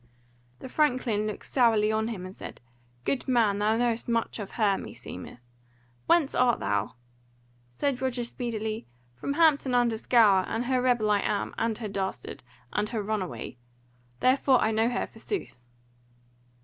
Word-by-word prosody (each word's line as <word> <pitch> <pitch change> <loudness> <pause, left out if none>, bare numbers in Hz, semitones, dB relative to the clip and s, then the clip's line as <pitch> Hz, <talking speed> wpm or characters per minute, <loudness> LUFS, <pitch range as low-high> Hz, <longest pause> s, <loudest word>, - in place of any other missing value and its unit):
The - - -6
franklin 250 -7 +1
looked 210 - -6
sourly 225 -4 +3
on 220 0 0
him 205 -6 -5
and 185 +1 -9
said: - - -9 0.5
"Good 275 - -1
man, 225 -6 +3
thou 215 +2 +2
knowest 235 -1 0
much 230 0 -1
of 200 -2 -7
her, 205 -4 +2
meseemeth 120 - -9 0.7
Whence 330 -5 +3
art 250 -1 +3
thou?" 100 +4 -1 0.7
Said 255 - -2
Roger 255 -2 -1
speedily: 225 -2 -4 0.3
"From 200 - -3
Hampton 285 -5 +3
under 240 -2 +2
Scaur; 215 -5 +4
and 230 +2 -2
her 255 0 +1
rebel 240 -4 +2
I 205 - +3
am, 205 0 -1
and 225 -1 -1
her 225 - -4
dastard, 190 -9 -4 0.3
and 210 0 0
her 225 -3 -2
runaway. 200 - -4 0.6
Therefore 260 0 +4
I 220 - +2
know 225 +2 +2
her 245 - -1
forsooth." 385 - -6
225 Hz, 150 wpm, -27 LUFS, 210-250 Hz, 0.7 s, Scaur